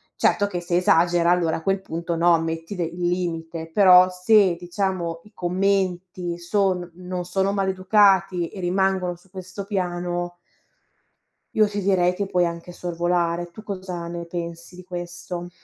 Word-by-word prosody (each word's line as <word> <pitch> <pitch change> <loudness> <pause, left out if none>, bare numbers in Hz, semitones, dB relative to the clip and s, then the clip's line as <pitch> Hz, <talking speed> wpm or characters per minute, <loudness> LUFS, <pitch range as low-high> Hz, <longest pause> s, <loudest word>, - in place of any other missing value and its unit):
certo 205 - +2
che 180 -3 -3
se 175 0 0
esagera 175 -1 +3
allora 175 -2 +2
a - - -8
quel 195 +2 0
punto 170 -1 -4
no, 170 0 +4
metti 165 +3 -4
de 180 - -1
il 175 +1 -3
limite, 165 -2 -3
però 185 -1 +7
se 185 0 +4
diciamo 175 -2 -2
i 210 - -17
commenti 180 -1 -1
son 180 0 0
non 180 0 -5
sono 190 +2 0
maleducati 190 -2 +3
e 195 - -10
rimangono 185 0 +1
su 175 +2 -23
questo 185 +1 -8
piano. 175 -3 -2 1.2
Io 215 -1 +4
ti 205 0 -3
direi 180 -2 +2
che 200 +2 -3
puoi 180 -2 +2
anche 170 +1 -5
sorvolare. 175 0 -1
Tu 210 +5 -12
cosa 185 -4 -5
ne 170 0 -5
pensi 170 0 -6
di 180 - -11
questo? 175 0 -6
180 Hz, 155 wpm, -23 LUFS, 175-190 Hz, 1.2 s, però